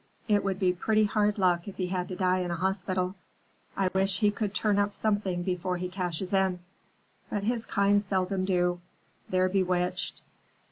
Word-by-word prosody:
It 205 -2 +3
would 195 -1 -1
be 185 -2 +2
pretty 215 +4 +2
hard 210 0 +1
luck 180 -2 +2
if 200 - -8
he 185 - 0
had 180 -1 -2
to 185 - -5
die 185 0 +2
in 180 -1 -2
a 170 - -1
hospital. 185 0 -1 0.6
I 190 -1 +2
wish 190 0 +1
he 210 -2 +3
could 205 -1 -2
turn 205 -1 +1
up 205 0 +1
something 205 -5 0
before 180 0 -1
he 180 +1 -3
cashes 180 0 -3
in. 190 -2 +2 0.7
But 205 -1 -2
his 230 +1 -1
kind 200 +1 +3
seldom 190 -1 0
do; 180 -2 +1 0.5
they're 185 0 +3
bewitched. 180 -1 -1
190 Hz, 180 wpm, -28 LUFS, 180-200 Hz, 0.7 s, It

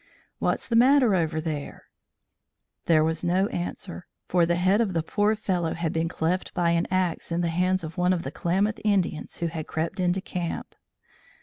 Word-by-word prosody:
"What's - - -1
the 235 - 0
matter 255 -1 +5
over 160 -3 +1
there?" 155 -3 -5 1.0
There 155 -2 +5
was 160 +1 -1
no 180 +3 +2
answer, 175 +1 -5 0.2
for 175 -2 +3
the 175 - +2
head 185 +5 +3
of 205 -5 0
the 165 -2 0
poor 205 +5 +1
fellow 180 -6 -1
had 170 -2 -2
been 165 0 0
cleft 175 +2 -2
by 170 -1 +2
an 170 0 +1
axe 185 -3 -1
in 170 +1 0
the 170 - 0
hands 185 +2 +1
of 160 +2 -6
one 180 +1 +3
of 175 -2 0
the - - -5
Klamath 195 +5 0
Indians 195 -7 0
who 170 - -2
had 160 -2 -4
crept 160 +4 -3
into 180 +1 +1
camp. 175 -2 -5
175 Hz, 190 wpm, -26 LUFS, 165-190 Hz, 1.0 s, matter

